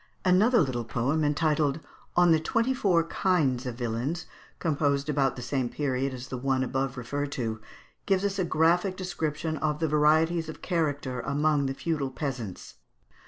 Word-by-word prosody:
] - - -37
Another 205 +6 +5
little 130 -5 -1
poem 125 +7 0
entitled, 150 0 +1 0.4
"On 175 -1 +5
the 160 - +5
Twenty 230 +10 +1
four 185 -9 +2
Kinds 150 -8 +1
of 125 - -4
Villains," 120 +8 -2 0.3
composed 145 -2 0
about 140 -2 +1
the 125 - -7
same 130 -1 -1
period 135 -1 -1
as 130 0 -8
the 130 - -4
one 130 0 +1
above 130 0 -2
referred 140 +4 -3
to, 110 -3 -3 0.5
gives 195 -1 +2
us 200 0 -1
a - - +2
graphic 175 +3 +2
description 160 -3 -3
of 150 -1 0
the 160 0 0
varieties 155 +2 +3
of 155 - -9
character 145 -7 -1
among 145 +2 +1
the 135 - -3
feudal 150 -3 -2
peasants. 125 -8 -5
150 Hz, 165 wpm, -28 LUFS, 130-165 Hz, 0.5 s, Another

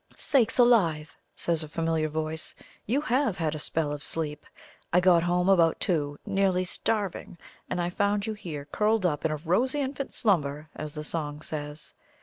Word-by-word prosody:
"Sakes 260 -7 +2
alive!" 180 -11 +3 0.2
says 165 -2 -1
a 155 - -5
familiar 160 0 0
voice; 155 +1 -1 0.3
"you 260 +7 +1
HAVE 255 -5 +1
had 160 -3 -1
a 155 - -5
spell 150 0 -1
of 145 0 -5
sleep! 150 -2 +1 0.4
I 180 - +5
got 180 -2 +5
home 175 +1 +1
about 170 -4 +4
two, 145 -6 -1
nearly 195 -3 +1
starving, 200 -2 -2 0.3
and - - -2
I 175 0 -1
found 200 +2 0
you 220 - -2
here 165 -9 -7
curled 210 +4 +1
up 155 -3 0
'in - - +3
a 155 - -2
rosy 210 - +1
infant 275 0 -4
slumber,' 150 -8 0
as 155 0 -6
the 150 - -4
song 150 -1 -3
says. 150 0 -5
170 Hz, 175 wpm, -27 LUFS, 155-205 Hz, 0.4 s, I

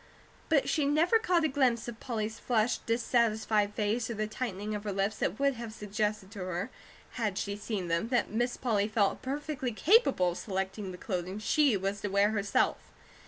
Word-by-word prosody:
But 305 -4 +3
she 300 -3 +1
never 325 +10 +4
caught 360 -7 +2
a - - +4
glimpse 260 -5 +1
of 235 -1 -7
Polly's 220 -3 -3
flushed, 235 -1 0
dissatisfied 220 -3 +1
face 220 +3 0
or 235 - -3
the 215 0 -1
tightening 215 -2 -4
of 205 -1 -4
her 210 - -2
lips 195 +2 -1
that - - -1
would 280 0 +3
have 235 -2 -7
suggested 210 -1 -2
to 210 - -9
her, 185 +5 -3 0.5
had 205 -4 0
she 200 0 -2
seen 205 -3 -4
them, 170 +5 0
that 245 0 +1
Miss 240 +3 0
Polly 210 -5 +1
felt 215 -2 +1
perfectly 275 -1 -3
capable 270 - +4
of 175 - -6
selecting 190 0 -3
the 180 - -8
clothing 185 0 -3
she 255 +2 +3
was 195 +1 -2
to - - -2
wear 200 +1 +3
herself. 200 -2 +1
215 Hz, 190 wpm, -30 LUFS, 200-245 Hz, 0.5 s, never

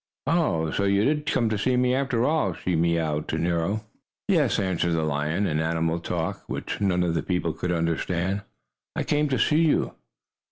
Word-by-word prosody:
"Oh, 130 - +1
so 100 - 0
you 100 +1 +3
did 150 0 0
come 120 -6 +2
to 110 -2 -1
see 125 +5 +1
me, 125 0 +3
after 130 -3 +1
all!" 155 +2 +1
she 90 - -2
mewed 80 -2 0
to - - -2
Nero. 85 +5 0 0.4
"Yes," 160 - +3
answered 90 -4 0
the 80 -1 +1
lion, 75 +6 0
in 80 -4 0
animal 80 +1 0
talk, 85 -1 -3
which - - -4
none 90 -3 +2
of 85 -2 0
the 80 - 0
people 90 -2 -1
could 90 - -3
understand, 85 +3 -1 0.5
"I - - 0
came 150 0 +1
to 130 - +1
see 155 +2 +3
you." 160 -3 +2
90 Hz, 190 wpm, -25 LUFS, 80-125 Hz, 0.5 s, you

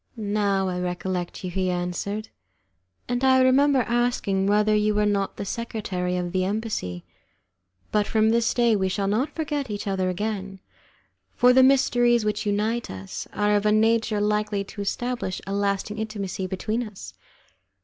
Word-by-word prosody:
"Now 200 -2 0
I 180 -1 -2
recollect 180 0 -3
you," 180 - -4
he 185 0 -1
answered, 180 +4 -3 0.8
"and 245 +1 -1
I 260 0 +5
remember 265 +1 +4
asking 230 -4 0
whether 210 +1 +3
you 210 0 +2
were 210 0 +2
not 200 -1 0
the - - -4
secretary 195 -5 -3
of 175 -1 -3
the 185 0 0
embassy. 195 - -3 0.9
But 210 -1 +1
from 220 0 +3
this 230 0 +2
day 235 -2 +3
we 190 -2 0
shall 195 +2 -1
not 220 +9 0
forget 295 -4 -2
each 205 -1 -4
other 190 -2 0
again, 195 0 -4 0.8
for 250 +1 +5
the 260 - +6
mysteries 245 -3 +4
which 210 0 -1
unite 215 +3 0
us 95 0 -7
are 210 0 +1
of 205 - +1
a 210 - +3
nature 220 0 +2
likely 210 -1 0
to 200 +1 -8
establish 240 -1 -2
a 195 - -4
lasting 200 +1 -1
intimacy 200 -4 -4
between 215 +5 -2
us." 195 - -8
210 Hz, 160 wpm, -25 LUFS, 190-230 Hz, 0.9 s, the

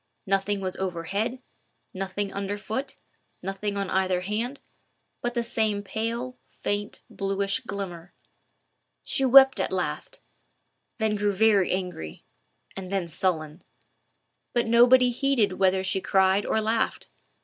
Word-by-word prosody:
Nothing 195 0 0
was 185 -1 -3
overhead, 195 +7 -2 0.5
nothing 195 +1 -3
under 200 +1 -3
foot, 265 +6 -4 0.5
nothing 195 +2 -3
on 200 -1 -1
either 185 -1 +1
hand, 225 +8 -3 0.6
but 240 0 -2
the 235 - +1
same 220 -3 0
pale, 230 +5 -4
faint, 205 0 -4
bluish 195 +2 -1
glimmer. 190 -7 -7 0.9
She 270 - +1
wept 265 +1 +7
at - - -1
last, - - -3 0.8
then 220 -2 +1
grew 205 -1 0
very 205 -2 +3
angry, 180 - -4 0.5
and 190 -1 -7
then 195 -3 -1
sullen; 160 -2 -1 0.9
but 240 -1 +2
nobody 245 +2 +6
heeded 245 -6 +1
whether 190 0 +3
she 190 +1 0
cried 190 +1 +3
or - - +1
laughed. 220 +1 -1
200 Hz, 125 wpm, -26 LUFS, 190-230 Hz, 0.9 s, wept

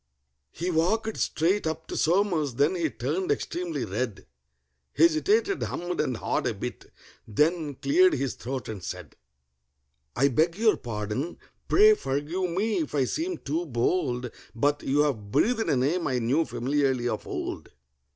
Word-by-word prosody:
He 175 - -3
walked 215 +7 +1
straight 175 +3 +1
up 160 0 -3
to - - -6
SOMERS, 165 - +1
then 145 +7 +3
he 170 -4 0
turned 150 +10 -2
extremely 170 -6 -2
red, 110 +2 -3 0.7
Hesitated, 385 +5 +3
hummed 175 +1 -2
and 125 - -2
hawed - - -1
a - - -1
bit, - - -7 0.4
then 150 - +1
cleared 360 - +4
his 135 -3 -1
throat, 130 -1 -5
and 105 -5 -6
said: - - -7 1.0
"I 140 +3 +4
beg 160 +6 +1
your 220 0 +3
pardon—pray 125 - +1
forgive 165 - -2
me 200 +3 0
if 150 -2 -3
I 140 - +3
seem 335 - -2
too 165 +5 -3
bold, 125 -1 0 0.2
But 145 +5 +1
you 145 +2 +2
have 120 -9 -1
breathed 225 - +2
a - - +3
name 150 +8 +1
I 130 -3 0
knew 130 +7 +1
familiarly 130 -1 0
of 110 -3 -3
old. - - -5
155 Hz, 150 wpm, -27 LUFS, 130-185 Hz, 1.0 s, cleared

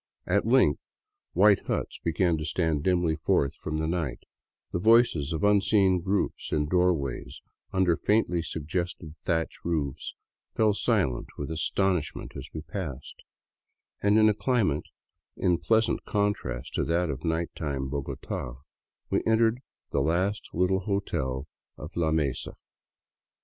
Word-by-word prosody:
At - - +1
length - - +4 0.5
white 100 -1 +4
huts - - -2
be 85 - +1
gan 85 0 +2
to - - -3
stand 80 -1 0
dimly 85 -2 +1
forth 70 -2 +1
from 80 0 -4
the 80 - -1
night; 80 -6 -2 0.5
the - - -1
voices 110 - +4
of 80 -1 -2
unseen 100 -2 +4
groups 95 +3 -1
in 75 - +2
the 75 - -6
doorways 90 -8 0 0.3
under 95 -3 +3
faintly 95 -5 +1
suggested 80 0 -4
thatch 80 -1 -1
roofs 75 -6 -2 0.4
fell 110 -1 +3
silent 100 - +1
with 75 +2 -4
astonishment 85 +1 -1
as 70 +1 -7
we 80 - -5
pass, 75 -7 -6 0.9
ed; - - 0
and 105 +1 +5
in 110 0 +6
a 110 - +4
climate* 100 - +1 0.5
in 90 -2 +2
pleasant 110 +7 +2
contrast 100 - -2
to - - 0
that 85 0 +1
of 70 +2 -6
night 80 0 -1
time 70 -3 -3
Bogota 65 -3 -4 0.6
we - - +2
entered 115 +1 +3 0.3
at - - 0
last 90 +8 0
the - - -8
little 90 +1 +3
hotel 75 -10 -2 0.3
of 75 +4 -9
La 80 -2 +1
Mesa. 75 -5 -1
85 Hz, 145 wpm, -27 LUFS, 75-100 Hz, 0.9 s, in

